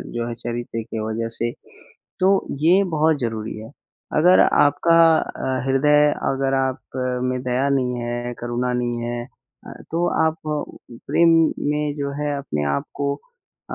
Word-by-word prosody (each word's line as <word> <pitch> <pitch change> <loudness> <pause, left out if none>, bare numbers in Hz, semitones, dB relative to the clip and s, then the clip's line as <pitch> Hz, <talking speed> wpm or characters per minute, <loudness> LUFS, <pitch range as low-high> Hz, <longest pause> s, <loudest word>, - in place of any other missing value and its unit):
जो 120 0 -2
है, 120 - -4
चरित्र 120 0 -4
की 110 0 -6
वज़ह 115 +1 -2
से, 120 +1 -1 0.7
तो 195 +1 +3
ये 175 +6 +5
बहुत 155 0 +3
ज़रूरी 110 -3 -3
है। 110 +1 -10 0.5
अगर 180 +4 +6
आपका 145 +4 +4 0.2
अ, 130 0 -3
हृदय 150 +2 +4 0.2
अगर 135 0 0
आप 130 -1 0 0.5
में 125 0 -1
दया 130 +2 0
नहीं 130 -2 +1
है, 120 +1 -3
करुणा 120 +1 -2
नहीं 120 -1 -1
है 120 0 -3 0.4
अ, - - -9 0.2
तो 170 +2 0 0.2
आप 160 0 -1 0.7
प्रेम 170 0 +4 0.4
में 150 0 -1
जो 140 -1 -3
है 145 -1 -1
अपने 75 - -3
आप 70 - -2 0.2
को 140 0 0 0.6
अ - - -3
130 Hz, 155 wpm, -22 LUFS, 120-150 Hz, 0.7 s, अगर